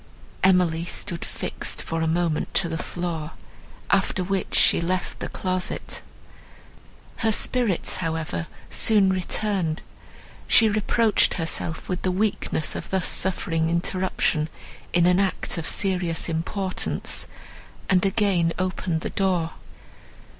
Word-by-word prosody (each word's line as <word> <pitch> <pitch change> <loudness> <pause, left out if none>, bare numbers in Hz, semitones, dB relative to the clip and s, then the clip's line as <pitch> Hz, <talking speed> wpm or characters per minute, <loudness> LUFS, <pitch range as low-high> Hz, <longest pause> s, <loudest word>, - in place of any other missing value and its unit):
Emily 180 -3 +4
stood 175 -1 -2
fixed - - -4
for 165 0 -3
a 160 - +1
moment 165 -1 0
to 175 - +2
the 165 -1 -3
floor, 170 -3 -4 0.6
after 190 -1 +2
which 190 0 -2
she - - +5
left 185 +2 -2
the - - -4
closet. 185 -1 -3 1.2
Her 225 -1 +2
spirits, 225 -3 +2
however, 160 - -3 0.2
soon 205 -4 +4
returned; 185 -3 -1 0.6
she 225 - +6
reproached 215 +1 +2
herself 165 -1 -1
with 180 -1 -2
the 185 - 0
weakness 190 -5 0
of - - -6
thus 190 -2 0
suffering 165 -3 +2
interruption 170 -2 0 0.4
in 175 -1 +3
an 180 +1 +4
act 195 -3 0
of 160 - -4
serious 180 -4 +1
importance, 185 +4 -2 0.6
and 185 -2 +3
again 190 -4 +2
opened 185 -3 -1
the - - -4
door. 180 -4 0
180 Hz, 120 wpm, -24 LUFS, 165-190 Hz, 1.2 s, she